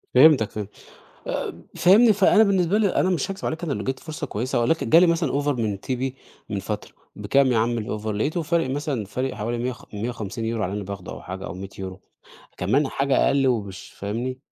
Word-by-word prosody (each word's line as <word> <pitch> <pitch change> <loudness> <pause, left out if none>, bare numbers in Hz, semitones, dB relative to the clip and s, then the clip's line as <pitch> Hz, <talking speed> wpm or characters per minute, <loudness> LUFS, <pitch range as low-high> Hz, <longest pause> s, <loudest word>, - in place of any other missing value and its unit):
فهمتك، 130 -5 +6
فهمتك. 105 -1 -6 0.6
آآ، - - -4
فاهمني؟ 215 +5 +6
فأنا 210 +2 +5
بالنسبة 195 -1 +3
لي، 210 - +3
أنا 185 - +3
مش 185 +2 0
هاكذب 195 +1 -6
عليك، 165 +2 -3
أنا 155 - -2
لو - - -3
جات 130 0 -2
فرصة 155 -1 -6
كويسة، 120 +1 -1
ولكن 125 +8 +1
جه 160 - +8
لي 180 - +6
مثلًا 165 -3 +1
offer 145 - -2
من 110 -8 0
TP 130 0 -2 0.4
من - - -2
فترة، - - -5 0.2
بكام 140 0 +3
يا 115 - +3
عم 120 +1 +1
الoffer؟ 105 0 -5
لقيته 145 - -1
فارق 165 -4 0
مثلًا، 140 -4 -2
فارق 130 +6 -3
حوالي 115 +3 -3
مِيِّة 125 +2 -1
وخ 120 - -12
150€ 115 0 -3
على 95 - -2
اللي 105 - -2
أنا 95 - -7
باخده، 100 -3 -6
أو - - -9
حاجة، 95 +1 -7
أو - - -6
100€. 95 0 -8 0.6
كمان 135 +11 +1
حاجة 135 0 +2
أقل، 140 -1 +3
ومش 100 -6 -2
فاهمني؟ 120 +6 -3
130 Hz, 205 wpm, -24 LUFS, 105-155 Hz, 0.6 s, جه